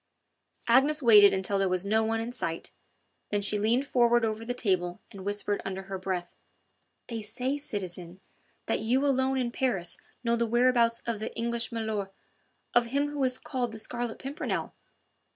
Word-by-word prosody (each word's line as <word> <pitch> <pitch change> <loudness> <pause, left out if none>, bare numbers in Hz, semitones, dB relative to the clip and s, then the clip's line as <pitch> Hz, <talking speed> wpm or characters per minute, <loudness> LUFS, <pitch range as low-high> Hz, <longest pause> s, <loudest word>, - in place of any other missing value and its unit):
Agnes 295 +3 +5
waited 210 -4 +8
until 195 +1 0
there 195 -1 +2
was 185 +1 -1
no 220 +2 +2
one 225 0 0
in 230 +2 -3
sight, 170 -9 -4 0.6
then 205 - +1
she 205 +1 -1
leaned 235 +6 +2
forward 240 -3 +3
over 220 0 -2
the 245 +2 -3
table 180 -6 0
and 195 -2 -9
whispered 205 0 -1
under 190 0 -4
her 190 0 -5
breath: 185 -2 -3 0.7
"They 230 -2 -4
say, 250 +7 -2
citizen, 185 -8 -5 0.5
that - - 0
you 250 +6 +1
alone 265 -1 +2
in 245 -2 0
Paris 215 -10 -1 0.3
know 235 0 +2
the 235 0 0
whereabouts 235 0 +3
of 230 -3 -2
the 220 - -4
English 235 0 -1
milor' 220 -3 -2 0.6
of 240 -1 +4
him 280 +4 0
who 290 -2 -2
is 255 -1 +1
called 250 -5 -3
the - - -7
Scarlet 240 +1 -3
Pimpernel...." 275 +3 -3
225 Hz, 170 wpm, -29 LUFS, 200-245 Hz, 0.7 s, waited